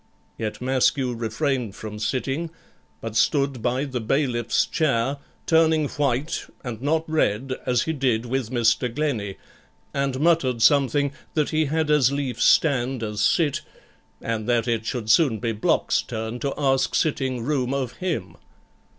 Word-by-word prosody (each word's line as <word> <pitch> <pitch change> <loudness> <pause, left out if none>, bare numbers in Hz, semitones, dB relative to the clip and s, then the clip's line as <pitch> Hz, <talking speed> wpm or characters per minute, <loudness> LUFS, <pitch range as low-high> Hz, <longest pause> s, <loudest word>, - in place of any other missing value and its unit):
Yet 110 +1 -5
Maskew 130 0 +1
refrained 120 0 -2
from 105 0 -7
sitting, 135 +9 -2 0.5
but 115 -1 -6
stood 135 +1 +2
by 125 +4 0
the 130 -4 -4
bailiff's 120 -1 +1
chair, 140 -3 0 0.3
turning 160 -2 +3
white, 140 +2 -1 0.2
and 120 -3 -6
not 160 +3 0
red, 135 -5 0
as 125 -1 +2
he 160 - -2
did 125 -5 0
with 125 -1 -2
Mr. 120 0 +2
Glennie; 120 -9 -2 0.6
and 140 -1 -1
muttered 140 -8 +2
something, 140 +1 +4 0.2
that 150 -2 +1
he 155 0 +2
had 155 +1 0
as 140 -4 +4
lief 140 -3 -3
stand 130 -5 +3
as 105 -1 -3
sit, 145 +6 +2 0.6
and 115 0 -3
that 120 -1 +2
it 115 -1 -1
should 120 -3 -3
soon 130 -4 +4
be 115 +1 -2
Block's 105 -1 +1
turn 110 +2 -5
to 140 - -1
ask 135 -2 +1
sitting 130 -5 0
room 130 -2 0
of 135 -3 -3
him. 160 - -3
130 Hz, 150 wpm, -24 LUFS, 115-145 Hz, 0.6 s, something